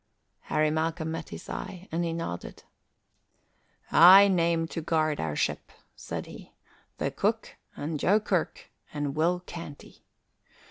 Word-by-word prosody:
Harry 155 0 +1
Malcolm 160 +1 -2
met 165 0 -6
his - - -9
eye, 185 +1 -7
and 165 +2 -1
he 170 - -1
nodded. 165 - -6 1.3
"I 190 +4 +9
name 170 -3 +1
to 165 - -4
guard 155 -2 0
our 75 -2 -2
ship," - - -2 0.2
said - - -6
he, - - -12 0.4
"the - - -2
cook - - -1 0.2
and 150 +1 -4
Joe 205 +8 +3
Kirk 190 -5 -2 0.2
and 145 -2 -3
Will 175 +3 +1
Canty. 165 -5 -10
165 Hz, 135 wpm, -27 LUFS, 155-175 Hz, 1.3 s, I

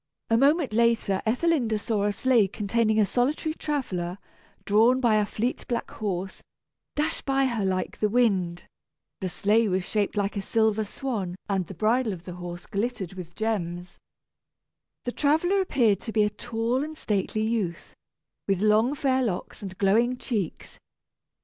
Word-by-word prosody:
A 225 - +5
moment 280 -1 +3
later 230 -4 +2
Ethelinda 250 -3 +2
saw 210 -1 -1
a 205 - +2
sleigh 230 0 +3
containing 220 +2 +1
a 210 - +5
solitary 280 +8 0
traveller, 190 - -3 0.5
drawn 225 +5 +4
by 235 -4 +3
a 210 -1 +1
fleet 235 +5 -2
black 240 - -2
horse, 190 -3 -4 0.5
dash 300 +2 0
by 270 0 +1
her 235 -5 -1
like 185 -1 -2
the 210 - +2
wind. 190 -7 +1 0.5
The 185 - -2
sleigh 215 +5 +2
was 185 0 0
shaped 210 -1 -1
like 200 +1 0
a 200 - -1
silver 220 +1 +1
swan 205 -7 -4
and 190 -3 -1
the 195 - -9
bridle 220 +4 +1
of 175 -2 -9
the 180 - -6
horse 175 0 -7
glittered 200 -3 -3
with 175 -3 -9
gems. 180 -5 -3 1.0
The 245 - -2
traveller 320 +9 +2
appeared 230 - +2
to 225 - -6
be 215 -1 +3
a 210 - +1
tall 240 +4 -1
and 310 +1 -7
stately 215 -1 -1
youth, 215 -7 -2 0.5
with 195 -2 +1
long 215 +6 +3
fair 265 -2 +1
locks 200 -8 -3
and 190 -2 -7
glowing 230 +6 +3
cheeks. 210 -10 -4
215 Hz, 160 wpm, -26 LUFS, 195-245 Hz, 1.0 s, A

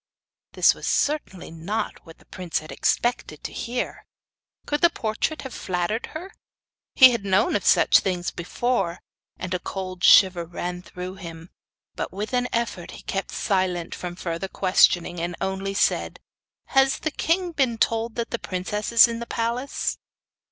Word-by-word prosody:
This - - +5
was - - -7
certainly 290 - -1
not 170 +4 -4
what 165 - -13
the - - -23
prince 180 -3 -4
had 155 -1 -6
expected 155 - -1
to - - -6
hear. 245 +1 -4 0.6
Could 295 0 -1
the 340 - +7
portrait 235 +2 -2
have 265 - -7
flattered 185 +5 -2
her? 370 +4 -9 0.6
He 260 -2 +9
had 235 -4 -2
known 200 - +2
of - - 0
such - - +5
things 180 -2 -2
before, 185 0 -1 0.4
and 185 0 -4
a 180 - 0
cold 185 -1 -6
shiver 185 -3 +7
ran 175 +1 -5
through 180 +1 -8
him; 165 -2 -10 0.4
but - - -4
with 210 +5 -5
an 250 0 +1
effort 230 -7 -2
he - - -13
kept 195 0 -3
silent 185 -3 -1
from 175 -1 -6
further 170 +1 -4
questioning, 185 -2 +3
and 175 +1 -3
only 195 +1 -2
said: - - +1 0.5
'Has 270 0 +4
the 315 - -2
king 350 +4 0
been 265 -7 +1
told 225 0 0
that 235 -1 -3
the 235 - -2
princess 185 +4 -3
is 230 +1 +8
in 230 0 -4
the 235 - -6
palace? 235 +5 -2
195 Hz, 165 wpm, -24 LUFS, 180-235 Hz, 0.6 s, He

